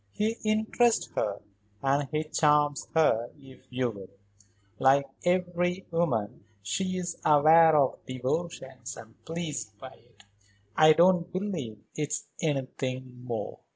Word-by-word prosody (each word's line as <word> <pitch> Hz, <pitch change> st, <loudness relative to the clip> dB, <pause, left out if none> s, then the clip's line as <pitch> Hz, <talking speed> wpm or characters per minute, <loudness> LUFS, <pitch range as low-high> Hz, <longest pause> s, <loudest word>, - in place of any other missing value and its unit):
He 220 Hz, +2 st, -1 dB
interests 220 Hz, +2 st, +1 dB
her, 100 Hz, -1 st, -2 dB, 0.4 s
and 140 Hz, 0 st, +1 dB
he 155 Hz, 0 st, -1 dB
charms 150 Hz, -2 st, +2 dB
her 120 Hz, -7 st, +3 dB
if 135 Hz, -2 st, -15 dB
you 125 Hz, -1 st, -1 dB
will. 100 Hz, -3 st, -11 dB, 0.7 s
Like 135 Hz, +1 st, +4 dB, 0.2 s
every 180 Hz, 0 st, 0 dB
woman, 125 Hz, -14 st, -1 dB, 0.2 s
she 185 Hz, -, -2 dB
is 175 Hz, -2 st, -5 dB
aware 155 Hz, +2 st, +6 dB
of 135 Hz, -3 st, +1 dB
devotion 130 Hz, +1 st, -4 dB, 0.2 s
and 110 Hz, 0 st, -15 dB
pleased 160 Hz, -10 st, -5 dB
by 130 Hz, +4 st, -10 dB
it. 115 Hz, -3 st, -23 dB, 0.5 s
I 155 Hz, 0 st, +7 dB
don't 175 Hz, +1 st, +3 dB
believe 165 Hz, -, -4 dB
it's 150 Hz, -1 st, -3 dB, 0.2 s
anything 130 Hz, -4 st, -3 dB
more." 120 Hz, -3 st, -5 dB
150 Hz, 120 wpm, -28 LUFS, 130-175 Hz, 0.7 s, I